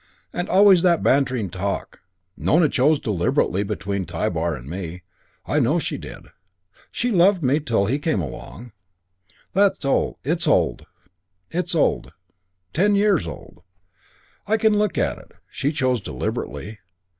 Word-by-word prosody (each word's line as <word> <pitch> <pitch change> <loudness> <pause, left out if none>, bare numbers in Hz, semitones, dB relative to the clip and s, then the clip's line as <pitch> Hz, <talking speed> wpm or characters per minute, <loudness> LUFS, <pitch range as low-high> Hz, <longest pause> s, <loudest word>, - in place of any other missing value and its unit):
And 175 - -3
always 195 -2 +6
that 175 -2 +3
bantering 125 -8 +1
talk. 100 +2 -4 0.3
Nona 155 -1 +3
chose 145 +4 +3
deliberately 95 -4 0
between 100 -1 -3
Tybar 85 -1 -1
and 65 -1 -10
me. 90 +1 -6 0.4
I - - +1
know - - +2
she - - -3
did. - - -11 0.6
She 245 +1 -1
loved 185 -2 +4
me, 135 +3 +2
till 115 -9 0
he 130 +8 0
came 145 -7 0
along. 100 - -7 0.8
It's 195 -5 +2
old. 145 - +1 0.7
Ten 160 - -1
years 200 -4 +2
old. - - -10 0.9
I 220 +2 +2
can 220 -1 +3
look 210 -3 0
at - - 0
it. - - -18 0.2
She 140 - -1
chose 130 -6 0
deliberately. 95 - -5
135 Hz, 125 wpm, -22 LUFS, -, 0.9 s, always